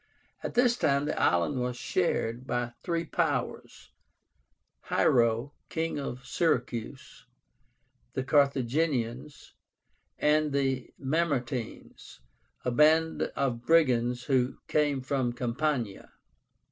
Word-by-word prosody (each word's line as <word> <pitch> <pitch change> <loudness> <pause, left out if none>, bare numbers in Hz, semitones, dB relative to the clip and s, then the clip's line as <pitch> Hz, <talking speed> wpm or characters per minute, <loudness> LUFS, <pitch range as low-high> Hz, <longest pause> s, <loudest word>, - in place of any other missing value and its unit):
At - - -5
this 245 0 +4
time 140 -6 +2
the 155 - -2
island 90 +10 +2
was 125 0 -2
shared 125 -9 -1
by 120 -1 -2
three 170 -1 -2
powers, 150 -7 -2 0.9
HIERO, 115 +3 +2 0.2
king 165 -2 -2
of 135 -1 -6
Syracuse, 130 -5 -2 0.9
the 130 - -2
CARTHAGINIANS, 140 -1 0 0.6
and 150 0 +2
the 135 -2 -1
MAMERTINES, 135 - -3 0.5
a 125 - +1
band 160 +4 +4
of 120 -4 -1
brigands 125 -6 +3
who 130 -2 +1
came 145 -3 +1
from 130 -2 -1
Campania. 120 -3 -2
135 Hz, 95 wpm, -29 LUFS, 120-150 Hz, 0.9 s, this